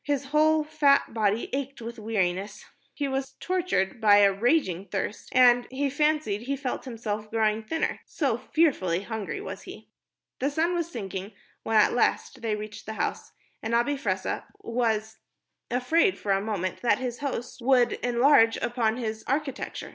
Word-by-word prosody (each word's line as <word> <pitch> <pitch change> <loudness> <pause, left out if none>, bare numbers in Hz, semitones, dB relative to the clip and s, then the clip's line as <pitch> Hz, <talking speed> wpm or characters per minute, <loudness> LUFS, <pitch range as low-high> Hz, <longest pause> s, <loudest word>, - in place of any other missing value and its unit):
His 285 -2 -1
whole 310 +2 +3
fat 290 -4 +2
body 215 0 +1
ached 275 0 -3
with 235 0 -7
weariness, 205 -1 -2 0.3
he 285 - -1
was 270 0 -3
tortured 335 - -1
by 205 -2 +7
a 200 -1 +5
raging 200 - +1
thirst, 205 - -4
and 245 -1 +5
he 275 +1 -1
fancied 300 -8 +1
he 275 +4 -2
felt 270 -1 -4
himself 215 -3 -4
growing 220 -1 +1
thinner 320 +9 -2
so - - 0
fearfully 195 - +1
hungry 220 - -4
was 410 - -7
he. - - -11 0.5
The 275 - +1
sun 325 +4 0
was 340 -1 -1
sinking 195 - -6 0.3
when 225 - +1
at 210 - +5
last 245 +1 0
they 225 -2 -1
reached 210 0 -8
the 220 - -4
house, - - -3 0.3
and 225 +1 -1
Abi 240 +5 +2
Fressah 190 -8 -2 0.2
was 220 -2 -1 0.5
afraid 320 +10 +2
for 200 - -2
a 195 0 +2
moment 195 -4 -3
that 240 - +3
his 250 -2 -4
host 260 -3 -4
would 245 -1 +4
enlarge 240 -1 +4
upon 235 -2 0
its 220 -3 -4
architecture. 275 +1 -3
240 Hz, 160 wpm, -27 LUFS, 215-280 Hz, 0.5 s, by